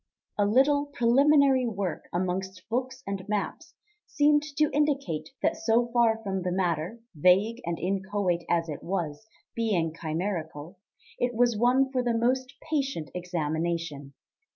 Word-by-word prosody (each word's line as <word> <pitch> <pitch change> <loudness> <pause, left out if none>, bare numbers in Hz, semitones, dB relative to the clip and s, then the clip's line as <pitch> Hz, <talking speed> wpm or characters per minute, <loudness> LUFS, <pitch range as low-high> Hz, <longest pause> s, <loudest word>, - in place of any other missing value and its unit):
A 205 - +4
little 285 +6 +3
preliminary 270 0 +4
work 200 -5 -3
amongst 185 +2 -3
books 255 +3 -3
and 195 -1 -4
maps 210 - -3 0.3
seemed 295 0 +3 0.2
to 305 -1 +3
indicate 275 - 0
that - - +2
so 235 +2 +1
far 235 -2 +4
from 190 -2 -2
the 180 0 -2
matter, 175 +2 -1 0.2
vague 195 +9 +3
and 170 -1 -2
inchoate 190 -2 -1
as 170 -1 +1
it 150 -3 -6
was, 175 0 -3 0.3
being 190 -9 0
chimerical, 165 0 -4 0.4
it 245 -1 0
was 240 0 +3
one 255 +4 +3
for 255 -2 +1
the 240 -2 0
most 255 +3 0
patient 275 - -2
examination. 165 -4 -3
205 Hz, 135 wpm, -27 LUFS, 175-250 Hz, 0.4 s, A